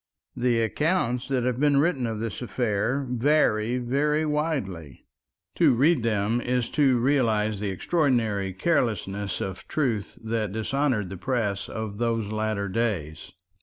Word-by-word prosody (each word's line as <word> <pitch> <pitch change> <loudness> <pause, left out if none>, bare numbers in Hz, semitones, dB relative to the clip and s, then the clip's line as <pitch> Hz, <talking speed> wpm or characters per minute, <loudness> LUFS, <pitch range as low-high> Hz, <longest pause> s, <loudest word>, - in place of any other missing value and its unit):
The 120 -2 +1
accounts 125 -1 0
that 130 -3 0
have 125 0 -1
been 145 -1 +3
written 140 -5 +2
of 110 -2 -3
this 115 0 -4
affair 125 +2 -1
vary 125 -3 +2
very 145 +5 +1
widely. 135 - -3 0.5
To - - +5
read 145 +4 +3
them 110 +1 0
is 125 -1 -1
to 135 -4 +3
realize 115 -5 +1
the 105 -1 -2
extraordinary 110 - 0
carelessness 100 - -1
of 95 -1 -5
truth 120 -9 -1
that 110 -2 -1
dishonored 110 -3 0
the 95 - -6
press 105 -3 -2
of 110 -2 -5
those 115 -3 -1
latter 110 -2 -1
days. 95 -8 -2
115 Hz, 135 wpm, -26 LUFS, 105-135 Hz, 0.5 s, To